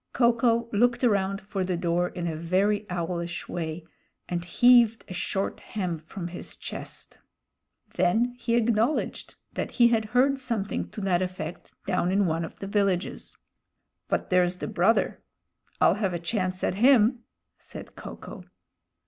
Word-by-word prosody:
Ko 240 -1 +4
ko 230 0 +1
looked 240 +4 +2
around 200 -3 +2
for 195 -1 -3
the 180 -1 -1
door 175 0 +1
in 175 -1 -5
a 165 -2 -2
very 195 +6 +1
owlish 170 0 -3
way 160 -1 -4 0.4
and 175 -1 -2
heaved 235 +3 +5
a 185 - -7
short 190 +2 -2
hem 180 -6 -4
from 170 +3 -7
his 175 - -8
chest. - - -8 0.8
Then 235 +7 +2
he 235 -1 0
acknowledged 235 +4 0 0.2
that - - -4
he 240 -2 +5
had 225 -2 +1
heard 260 +5 +2
something 230 -6 -3
to 210 - -7
that 185 -2 +1
effect 185 -1 -5
down 180 -2 +1
in 200 +1 +3
one 165 0 0
of 165 - -8
the - - -6
villages. 195 -3 -1 0.7
"But - - -2
there's 180 0 +3
the - - -4
brother. 195 +7 +1 0.6
I'll - - +5
have 190 -4 0
a - - -2
chance 185 +1 -2
at - - +1
him," 245 -2 +5 0.4
said - - -11
Ko - - -8
ko. - - -10
195 Hz, 155 wpm, -27 LUFS, 175-230 Hz, 0.8 s, heaved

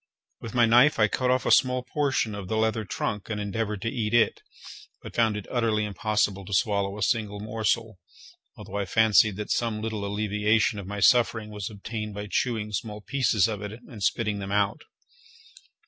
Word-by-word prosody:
With 115 +2 -8
my 120 -1 +5
knife 120 +6 +5
I 110 - +4
cut 125 +4 -1
off 130 -1 +1
a - - +1
small 125 -1 +4
portion 130 -4 -1
of 100 -2 -6
the 110 - -1
leather 110 0 0
trunk, 105 +2 -4
and 105 -1 -3
endeavoured 105 0 -3
to 115 - 0
eat 115 -3 -1
it, 110 -3 +3 0.6
but - - -9
found 110 -3 +2
it 100 - -6
utterly 110 -3 +1
impossible 105 -1 -1
to 100 +1 -3
swallow 100 -1 0
a 105 - -2
single 105 -3 0
morsel, 110 -1 -2 0.6
although 100 - -7
I 100 - -1
fancied 110 0 +4
that 105 +1 -5
some 115 -2 0
little 110 -1 -4
alleviation 105 +1 +1
of 95 - -8
my 100 0 -5
suffering 115 -2 +3
was 105 -2 -5
obtained 105 0 -6
by 105 0 -5
chewing 110 -1 -1
small 105 0 -4
pieces 115 -4 +2
of 105 -3 -4
it 105 0 -6
and 115 -2 -12
spitting 105 0 0
them 100 0 -5
out. 100 +7 0
105 Hz, 190 wpm, -26 LUFS, 105-115 Hz, 0.6 s, my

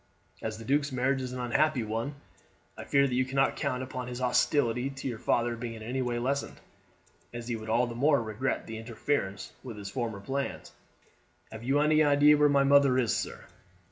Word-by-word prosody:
"As 110 -1 -4
the 115 - -10
duke's 140 +3 +1
marriage 130 +1 0
is 130 -1 -4
an 125 - -5
unhappy 130 +2 +1
one, 115 +6 -3 0.6
I - - -8
fear 140 0 +3
that 130 - -1
you 130 +1 +2
cannot 135 +1 +1
count 130 -2 -2
upon 130 -1 -5
his 125 -1 -5
hostility 125 0 +1
to 135 0 -6
your 120 -4 -4
father 120 0 +1
being 115 0 -6
in 110 - -9
any 125 +4 -2
way 120 -1 -1
lessened, 135 +4 -2 0.7
as 120 -1 -7
he 120 - -1
would 110 0 -7
all 120 +3 +3
the 120 - -6
more 140 +4 +3
regret 115 +3 -2
the 110 0 -6
interference 110 -4 -3
with 120 -5 -8
his 100 -1 -7
former 115 -3 -3
plans." 135 +7 -4 0.8
"Have 110 0 -8
you 135 +4 +2
any 155 +1 +4
idea 145 0 +6
where 150 0 +4
my 140 -1 +4
mother 140 -2 +5
is, 120 -3 +2
sir?" - - -4
125 Hz, 205 wpm, -29 LUFS, 115-140 Hz, 0.8 s, idea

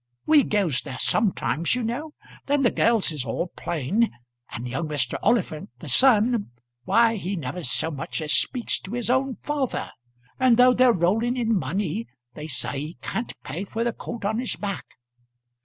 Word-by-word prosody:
We 310 -2 +6
goes 180 - +1
there 130 - -7
sometimes, 180 -3 +1
you 250 - -2
know. 280 +7 -3 0.3
Then 285 0 +2
the 240 - +4
girls 225 -6 +3
is 150 -5 -3
all 130 +9 -2
plain; 175 - 0 0.4
and 120 +2 -6
young 135 +7 -3
Mr. 145 -5 -1
Oliphant, 200 -9 +1
the 150 - -10
son, 235 - +4 0.4
why 230 - +4
he 190 +1 -3
never 160 +1 -5
so 160 +5 0
much 140 -3 -4
as 155 -1 0
speaks 250 -3 0
to 185 - -9
his 240 0 -1
own 260 0 +1
father; 290 -4 -2 0.5
and 255 -3 +5
though 250 0 +7
they're 250 0 +5
rolling 225 +7 +1
in 230 -2 +1
money, 160 - -2 0.3
they 150 +4 -7
say 140 -1 -4
he 155 +5 -6
can't 230 - -3
pay 160 +9 -4
for 225 +3 -3
the 235 -1 0
coat 235 -3 -7
on 220 +3 0
his 250 - -2
back. 200 -2 -4
205 Hz, 175 wpm, -25 LUFS, 155-240 Hz, 0.5 s, though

